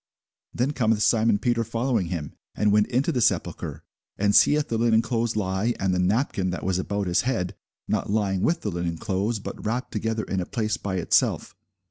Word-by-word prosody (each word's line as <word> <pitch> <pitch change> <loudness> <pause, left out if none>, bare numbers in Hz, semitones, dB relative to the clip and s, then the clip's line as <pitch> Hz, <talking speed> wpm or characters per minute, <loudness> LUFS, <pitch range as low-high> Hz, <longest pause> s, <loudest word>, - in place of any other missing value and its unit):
Then 125 +4 0
cometh 110 -5 +1
Simon 110 -1 +3
Peter 115 +2 0
following 115 -3 -1
him, 85 -5 -4 0.2
and 105 -1 +2
went 105 0 +4
into 130 +6 +1
the 125 -5 0
sepulchre, - - -1 0.3
and 100 0 +2
seeth 150 0 +5
the 115 - -1
linen 115 -1 +3
clothes 115 -1 -1
lie, 100 +3 0
and 95 -1 +1
the 90 - 0
napkin, 95 0 +1
that 90 - -4
was 95 0 0
about 100 +1 -2
his 90 -1 +2
head, 90 -9 -1 0.3
not - - -1
lying 100 -3 0
with 170 - +1
the 105 - -2
linen 85 -1 -3
clothes, 105 +4 -1
but 105 - -8
wrapped 120 +4 -2
together 110 0 -2
in 95 - -2
a 90 - -2
place 110 -4 -1
by 95 -2 -4
itself. 90 - +1
105 Hz, 195 wpm, -25 LUFS, 95-115 Hz, 0.3 s, seeth